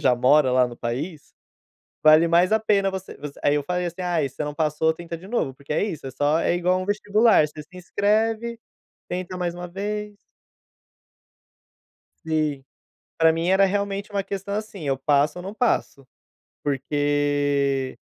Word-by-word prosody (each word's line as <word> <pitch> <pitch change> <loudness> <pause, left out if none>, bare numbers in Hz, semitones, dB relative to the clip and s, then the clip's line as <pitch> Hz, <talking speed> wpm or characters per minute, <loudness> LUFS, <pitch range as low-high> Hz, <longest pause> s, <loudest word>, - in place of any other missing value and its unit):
já 125 -2 +4
mora 130 +2 +4
lá 125 -1 +4
no 120 - -8
país, 145 +7 -5 0.7
vale 155 +2 +7
mais 175 +4 +4
a 220 - +4
pena 200 -3 +2
você 190 0 -7
você 145 -1 -9
aí 145 - +3
eu 145 - 0
falei 180 0 -1
assim: 175 +2 -5
"Ai, 170 -6 0
você 140 - -5
não 150 0 -5
passou, 160 0 +1
tenta 170 0 -7
de 185 - -13
novo." 205 - -1
Porque 140 +2 -7
é 150 - +1
isso, 160 -9 -5
é - - -4
só 145 +4 +1
é 170 - +1
igual 180 +1 +1
um - - -3
vestibular, 210 -1 +3
você 150 - -10
se 180 +5 -17
inscreve, 220 +5 0 0.5
tenta 180 +1 -4
mais 175 -1 -2
um 175 0 -7
vez. 210 +2 -4 2.1
Sim. 155 -4 -1 0.6
Para 160 0 +5
mim 165 +2 -1
era 190 +1 +5
realmente 200 +1 -1
uma 200 - 0
questão, 200 +1 -5
assim, 210 -6 -5
eu 135 -1 +1
passo 145 +4 +1
ou - - -8
não 195 +2 -6
passo. 215 - -1 0.6
Porque 145 -1 0
170 Hz, 170 wpm, -24 LUFS, 145-195 Hz, 2.1 s, vale